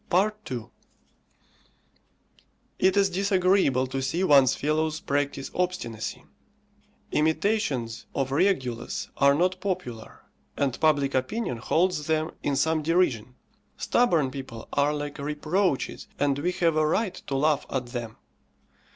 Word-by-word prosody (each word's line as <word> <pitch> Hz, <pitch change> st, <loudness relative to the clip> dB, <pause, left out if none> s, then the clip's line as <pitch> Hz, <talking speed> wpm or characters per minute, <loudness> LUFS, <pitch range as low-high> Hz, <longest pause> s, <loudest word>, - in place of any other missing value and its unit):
II. 190 Hz, -, 0 dB, 2.1 s
It 190 Hz, +1 st, +3 dB
is 195 Hz, -1 st, +3 dB
disagreeable 185 Hz, -, +2 dB
to 135 Hz, +1 st, -3 dB
see 160 Hz, +8 st, -1 dB
one's 140 Hz, -7 st, +5 dB
fellows 155 Hz, +1 st, 0 dB
practise 140 Hz, -1 st, -2 dB
obstinacy. 175 Hz, -12 st, -3 dB, 0.9 s
Imitations 150 Hz, -, 0 dB
of 135 Hz, -1 st, -1 dB
Regulus 135 Hz, -8 st, 0 dB
are 140 Hz, 0 st, +5 dB
not 180 Hz, +3 st, +1 dB
popular, 125 Hz, -, -5 dB, 0.3 s
and 135 Hz, -4 st, 0 dB
public 145 Hz, -3 st, +2 dB
opinion 130 Hz, -, -1 dB
holds 160 Hz, +5 st, 0 dB
them 160 Hz, +1 st, 0 dB
in 145 Hz, -, 0 dB
some 155 Hz, +3 st, +1 dB
derision. 145 Hz, -8 st, +1 dB, 0.4 s
Stubborn 170 Hz, -, +2 dB
people 130 Hz, -4 st, -8 dB
are 145 Hz, +1 st, +3 dB
like 145 Hz, -1 st, -5 dB
reproaches, 150 Hz, +3 st, -1 dB
and 140 Hz, -1 st, +1 dB
we 175 Hz, +5 st, 0 dB
have 165 Hz, -3 st, +1 dB
a 155 Hz, 0 st, +3 dB
right 195 Hz, +4 st, 0 dB
to 140 Hz, -, -2 dB
laugh 150 Hz, +1 st, +1 dB
at 130 Hz, -2 st, -2 dB
them. 120 Hz, -3 st, -6 dB
150 Hz, 120 wpm, -26 LUFS, 135-180 Hz, 2.1 s, one's